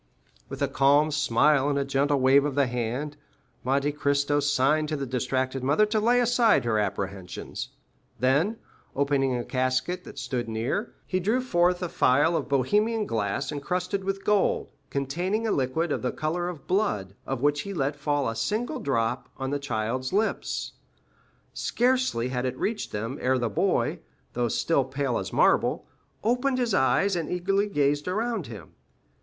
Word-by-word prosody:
With 135 +1 -4
a - - +2
calm 140 +3 +3
smile 145 0 +3
and 140 - 0
a 140 - 0
gentle 140 +1 +1
wave 135 +2 +5
of 145 -2 -2
the 140 -1 +3
hand, 125 +5 -3 0.5
Monte 140 +3 +1
Cristo 145 0 +1
signed 145 +2 +2
to 155 - -1
the 140 -2 -3
distracted 130 +1 -2
mother 145 +11 +4
to 215 +1 0
lay 240 +3 +3
aside 240 - +3
her 110 -2 +1
apprehensions; 95 -2 -4 0.5
then, 145 - +2 0.4
opening 140 -2 +1
a 120 - -3
casket 130 +7 -1
that - - -11
stood 120 -3 -3
near, 115 - -2
he 185 - -1
drew 215 +7 +1
forth 180 -7 +1
a - - 0
phial 150 +2 +3
of - - -2
Bohemian 210 - +2
glass 115 - -2
incrusted 180 +6 -2
with 195 0 -3
gold, 210 -2 +2 0.2
containing 175 +11 -1
a 220 - +1
liquid 140 +5 0
of - - -1
the 125 - -1
color 175 +3 -2
of 160 -6 -9
blood, 140 - 0
of 135 -2 -3
which 145 0 +2
he 200 - -6
let 145 -5 -1
fall 145 -2 0
a 115 - -2
single 245 - -2
drop 125 - -1
on 135 0 -3
the 145 - -1
child's 130 0 -2
lips. 215 +3 -1 0.8
Scarcely 250 - +1
had 125 0 -1
it 130 0 -4
reached 215 - -2
them, 115 +6 -4
ere 130 +1 +2
the 120 -2 -1
boy, 100 - 0 0.3
though 120 0 0
still 140 +5 +1
pale 135 -1 -2
as - - -5
marble, - - +2 0.4
opened 250 +3 +1
his 240 -4 0
eyes, 190 +7 +3
and 165 -3 -2
eagerly 195 +3 +1
gazed 145 -4 +1
around 215 - -1
him. 105 -9 -10
145 Hz, 170 wpm, -26 LUFS, 130-185 Hz, 0.8 s, wave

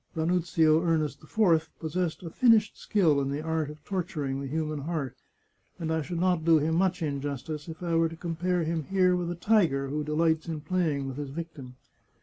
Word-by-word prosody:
Ranuzio 160 -1 +2
Ernest 155 -4 0
IV 165 -7 +2
possessed 165 +2 -2
a 165 - -6
finished 225 -2 +4
skill 160 -9 +2
in 135 - -1
the 145 +2 -3
art 160 -2 -1
of 150 0 -11
torturing 150 -8 -3
the 140 - -4
human 155 +1 -2
heart, 140 -4 -3 0.6
and 160 -2 -2
I 160 - 0
should 170 +2 -4
not 180 -2 +2
do 165 0 +5
him 155 +2 +1
much 180 +1 +1
injustice 145 +1 -4
if 160 +1 -8
I 170 -1 -1
were 165 0 +3
to 165 - -9
compare 175 +1 -1
him 160 -1 -2
here 185 0 +3
with 175 -1 -2
a 175 - -3
tiger 170 -8 +2
who 150 +2 -2
delights 160 +1 +1
in 160 -2 -4
playing 155 -5 0
with 135 0 -6
his 145 -2 -4
victim. 140 -4 -7
160 Hz, 195 wpm, -28 LUFS, 150-175 Hz, 0.6 s, do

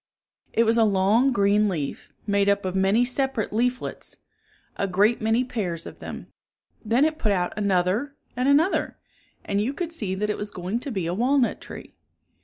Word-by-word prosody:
It 230 - +3
was 230 +1 +3
a - - +6
long 210 +6 +3
green 205 -1 +3
leaf, 150 -7 -4
made 200 -1 +2
up 200 -1 +1
of 185 0 -2
many 195 +5 +3
separate 265 -4 -1
leaflets, 250 +3 -2 0.6
a 200 - -1
great 205 +6 +2
many 225 +3 +2
pairs 185 -10 -3
of - - -10
them. - - -7 0.6
Then 235 +6 +3
it 315 0 -1
put 215 -9 +1
out 180 -2 0
another 200 +7 0 0.2
and 250 +3 +1
another, 310 +7 +2 0.5
and 200 0 0
you 245 +6 -1
could 335 0 -4
see 200 - -2
that 210 +2 -1
it - - -4
was 210 - -4
going 185 +4 -3
to 275 +2 -6
be 190 -6 -2
a 170 - -1
walnut 250 +5 +1
tree. - - -10
210 Hz, 185 wpm, -24 LUFS, 195-250 Hz, 0.6 s, a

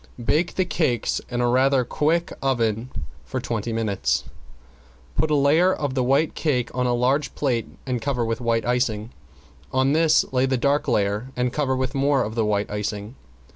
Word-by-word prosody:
Bake 165 +7 +1
the 185 - +1
cakes 130 - 0
in 120 0 -1
a 120 - +2
rather 130 +1 +3
quick 165 +6 0
oven 120 -3 0 0.3
for - - -4
twenty 115 0 -3
minutes. 100 - 0 0.9
Put 155 - +1
a 150 - +3
layer 150 +6 +4
of 145 -7 -2
the 130 -1 +1
white 140 +5 +2
cake 125 -6 -1
on 125 0 0
a 120 - +1
large 130 +5 +1
plate 125 -6 0 0.2
and 125 -3 -2
cover 125 -3 -1
with 115 +1 -2
white 115 -1 0
icing, 120 -2 0 0.6
on 130 +2 +2
this 160 0 +4
lay 130 0 +3
a 130 -1 +1
dark 140 +4 +1
layer 105 -1 0
and 125 0 -1
cover 140 -3 0
with 130 +1 -2
more 140 -1 +2
of 110 - -4
the 115 -1 0
white 105 -1 0
icing. 105 +1 -4
125 Hz, 180 wpm, -23 LUFS, 115-140 Hz, 0.9 s, layer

